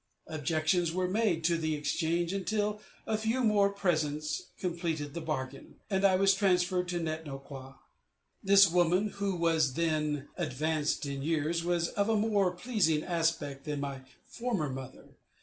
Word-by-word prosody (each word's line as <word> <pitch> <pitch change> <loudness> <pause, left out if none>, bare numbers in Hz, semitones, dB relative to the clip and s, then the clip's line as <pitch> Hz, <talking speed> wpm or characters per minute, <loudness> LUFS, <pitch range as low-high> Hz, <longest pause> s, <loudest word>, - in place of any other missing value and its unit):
Objections 160 +3 0
were 180 +1 0
made 190 -4 +1
to 170 +1 +2
the 155 -1 -1
exchange 165 +4 -1
until 210 +2 -1 0.2
a 220 -1 -1
few 225 +4 0
more 205 -3 +4
presents 155 - -1
completed 165 -5 -3
the 170 - -4
bargain, 135 -4 -5 0.2
and 190 0 +1
I 195 -1 +5
was 195 +1 +4
transferred 180 -2 +1
to 175 0 -2
Net 160 -1 -3
no 140 -3 -6
kwa. 135 -1 -11 0.7
This 195 0 +7
woman, 180 +4 +2
who 200 -2 0
was 160 -5 +2
then 150 -3 0
advanced 155 -1 -1
in 140 -1 -4
years, 160 +2 0
was 170 -1 0
of 200 +1 0
a 225 - +3
more 205 -3 +2
pleasing 180 -5 0
aspect 160 -5 -1
than 150 -1 -3
my 140 -1 -4 0.2
former 225 - -2
mother. 130 0 -8
170 Hz, 155 wpm, -30 LUFS, 150-195 Hz, 0.7 s, This